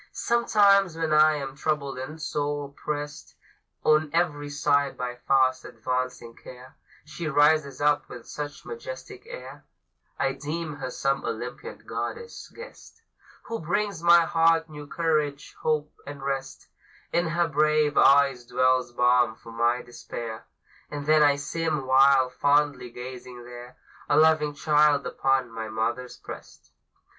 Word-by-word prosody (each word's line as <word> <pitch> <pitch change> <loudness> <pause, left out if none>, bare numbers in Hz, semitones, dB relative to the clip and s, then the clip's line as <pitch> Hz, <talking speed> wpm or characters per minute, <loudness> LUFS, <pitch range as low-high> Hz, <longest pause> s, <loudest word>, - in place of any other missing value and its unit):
Sometimes 200 -6 +3
when 160 -1 0
I 155 0 +5
am 135 -2 -5
troubled 145 -3 -2
and 150 +5 -7
sore 145 -1 -3
pressed 145 +1 -6 0.5
On 155 0 +3
every 150 -4 0
side 145 -1 +1
by 125 0 -4
fast 130 -1 +3
advancing 125 -2 -4
care, 130 +2 -13 0.3
She 155 +2 -6
rises 145 -2 +3
up 145 0 +2
with 120 - -10
such 145 0 -7
majestic 465 -3 -9
air, - - -10 0.5
I 135 - +1
deem 150 +2 -5
her 130 -3 -5
some 135 +2 -1
Olympian - - -6
goddess 470 0 -6
guest, 465 -1 -13 0.4
Who 230 -1 -5
brings 175 +2 -2
my 170 0 +7
heart 165 0 +3
new 150 -1 -9
courage, 150 -3 -1
hope, 150 -1 -1
and 140 -1 -8
rest; 135 -1 -4 0.5
In 175 0 +2
her 170 +1 +1
brave 155 -1 +2
eyes 135 -2 +5
dwells 130 0 +2
balm 120 -1 +3
for 115 - -13
my 120 +2 +1
despair, 115 -2 -8 0.4
And 145 -1 -6
then 155 0 +4
I 145 -1 +5
seem, 150 0 -2
while 130 0 +5
fondly 145 -1 +1
gazing 125 0 -9
there, 120 +1 -11 0.3
A 145 - +3
loving 155 -1 +4
child 150 -1 +3
upon 135 -2 0
my 110 -1 -6
mother's 120 +3 -3
breast. - - -12
145 Hz, 135 wpm, -26 LUFS, 130-155 Hz, 0.5 s, my